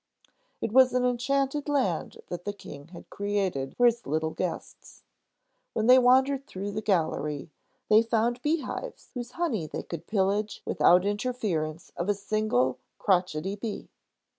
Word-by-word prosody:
It - - -2
was 255 +1 +6
an 250 0 +2
enchanted 275 +4 0
land 255 - -1
that 175 0 -5
the 205 - -3
King 145 -7 -11
had 170 0 -13
created 195 -10 -2
for 245 - +4
his 235 0 +2
little 160 +2 0
guests. 180 0 -6 0.7
When 220 - 0
they 255 +2 +8
wandered 265 +2 +3
through 200 +2 -5
the 210 +2 -3
gallery, 160 -6 -1 0.4
they 215 +1 +6
found 230 +1 0
bee 300 +3 +1
hives - - -7
whose 245 -1 -6
honey 255 - -1
they - - -5
could 170 0 -7
pillage 205 +1 0
without 180 +1 +4
the 200 - +1
interference 205 -9 -2
of 175 +4 -2
a 205 - +3
single 200 - 0 0.2
crotchety 185 -1 +1
bee. 210 +1 -6
205 Hz, 155 wpm, -28 LUFS, 175-250 Hz, 0.7 s, they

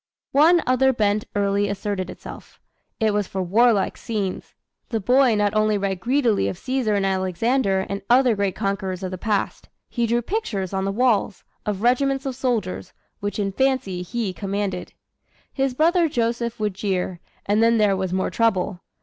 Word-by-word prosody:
One 325 +5 +5
other 260 +1 +3
bent 210 -2 +1
early 200 0 +1
asserted 200 -2 -3
itself. - - -11 0.4
It 220 -2 +2
was 205 -2 0
for 190 -1 -3
warlike 215 +3 +3
scenes. 205 -5 -4 0.3
The 225 - -1
boy 250 +3 +4
not 205 0 +1
only 215 -1 +2
read 195 -2 -2
greedily 240 0 +1
of 185 - -4
Caesar 255 -2 -1
and 200 -1 +1
Alexander 190 +2 +1
and 200 0 -4
other 245 -1 +5
great 200 -2 -1
conquerors 195 -2 -2
of 185 - -3
the 185 - -6
past 210 -2 -2 0.2
he 235 -1 -1
drew 235 +1 +1
pictures 210 - -3
on 190 0 -1
the 195 - 0
walls, 220 -3 +1 0.2
of 205 0 -2
regiments 270 +3 +2
of 265 -2 -3
soldiers, 225 -9 -2 0.3
which 205 0 -3
in 200 -2 -1
fancy 260 -6 0
he 210 +1 -3
commanded. 200 -1 -3 0.6
His 270 -2 -1
brother 335 +3 +3
Joseph 235 -2 -1
would 210 -2 -1
jeer, 185 -2 -2 0.3
and 205 +2 +2
then 230 0 +4
there 210 -2 +3
was 190 -1 -2
more 190 0 -1
trouble. 205 -5 +1
210 Hz, 170 wpm, -23 LUFS, 195-245 Hz, 0.6 s, One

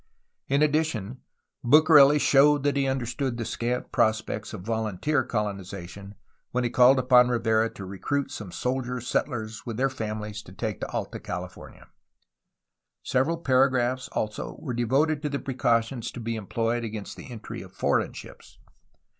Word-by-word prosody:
In 140 +2 +3
addition, 145 -7 -1 0.4
Bucareli 150 +1 +7
showed 145 0 +5
that 145 -1 +1
he 140 -1 +1
understood 130 -1 -2
the 115 - -3
scant 120 +3 -3
prospects 110 0 0
of - - -7
volunteer 110 +6 0
coloniza 100 -6 -4
tion 100 +3 -11 0.3
when 125 0 -1
he 120 - -1
called 125 +2 +6
upon 125 -1 +5
Rivera 115 -2 +2
to 100 - -7
recruit 100 +10 -2
some 100 -4 -7
soldier 125 +7 -2
settlers 110 -2 -3
with 115 -2 -4
their 135 +1 +1
families 110 -3 -5
to 90 - -14
take 110 0 -4
to - - -3
Alta - - -4
California. 90 0 -8 1.2
Several 135 +6 +1
paragraphs, 130 -3 +2
also, 105 -1 -3
were 130 -6 -5
devoted 140 +6 +1
to 150 - -2
the 140 - -2
precautions 120 -2 0
to - - -7
be 115 0 -3
employed 115 +3 -2
against 110 -2 -6
the - - -11
entry 115 -3 -7
of - - -12
foreign - - 0
ships. - - -12
120 Hz, 155 wpm, -26 LUFS, 110-135 Hz, 1.2 s, Bucareli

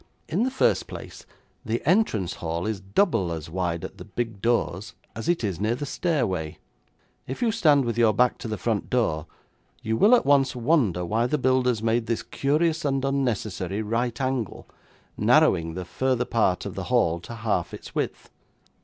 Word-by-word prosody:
In 175 +7 0
the 255 - +2
first 260 - +1
place, - - -10 0.4
the 115 +2 -1
entrance 155 - +2
hall 85 +1 -2
is 110 -2 -2
double 100 - +1
as 80 -1 -6
wide 85 -2 -2
at - - -10
the - - -7
big 115 -4 -4
doors 115 -4 0 0.2
as 115 +9 -4
it 175 -7 +1
is 95 -5 -2
near 110 +3 +1
the 145 - -4
stairway. 100 - -1 0.7
If 130 - -4
you 230 - +3
stand 150 - +4
with 120 0 -2
your 115 -2 +5
back 125 +4 +2
to - - -6
the 110 -1 -3
front 110 -4 -2
door 85 -11 0 0.6
you 110 +1 0
will 215 - +6
at - - +1
once 135 -2 +3
wonder 120 - +1
why 115 +6 +1
the 150 - 0
builders 125 -4 +1
made 115 +1 +1
this 115 - -1
curious 155 +4 0
and 135 -2 0
unnecessary 110 -7 -1
right 115 +3 -1
angle, 130 -4 -2 0.5
narrowing 80 0 +3
the 90 -1 -5
farther 130 +5 0
part 100 -7 +1
of - - -5
the - - -5
hall 85 +1 +2
to 115 +7 -9
half 110 -1 -1
its - - -10
width. - - -3
115 Hz, 180 wpm, -25 LUFS, 95-135 Hz, 0.7 s, will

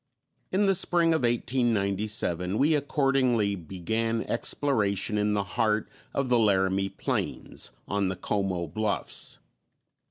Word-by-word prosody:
In 200 +2 +2
the 195 - +4
spring 170 -2 +3
of 160 - +1
1897 105 -6 0
we 150 +5 +3
accordingly 135 -7 +2
began 110 +6 -2
exploration 105 -6 0
in 105 0 +1
the 100 - +1
heart 110 +2 0 0.2
of 140 -1 -1
the 125 -1 +3
Laramie 95 -2 +2
Plains, - - -4 0.2
on 100 -1 0
the 95 - -2
Como 95 -2 -1
Bluffs. 105 +6 -2
110 Hz, 120 wpm, -27 LUFS, 100-125 Hz, 0.2 s, the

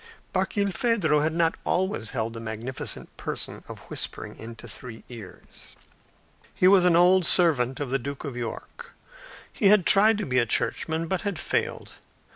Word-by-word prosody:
Barkilphedro 200 -5 +1
had 155 +2 +1
not 165 -1 +2
always 180 - -1
held 115 -2 -3
the 115 - -7
magnificent 115 +3 -5
position - - -6
of - - -9
whispering - - -5
into 115 0 -9
three 120 -4 -9
ears. 115 -6 -13 0.8
He 185 - +4
was 190 -2 +6
an 175 -2 +5
old 180 +2 +5
servant 140 -8 +3
of 140 -3 -4
the 135 - +1
Duke 140 +2 -6
of 140 -5 -5
York. 120 -2 -7 0.6
He 200 - +2
had 200 -3 +5
tried 210 +2 +5
to 210 - -3
be 125 -4 +1
a 120 - +1
churchman 160 +9 -1
but 185 +2 -2
had 200 -4 -3
failed. - - -2
155 Hz, 160 wpm, -26 LUFS, 120-185 Hz, 0.8 s, was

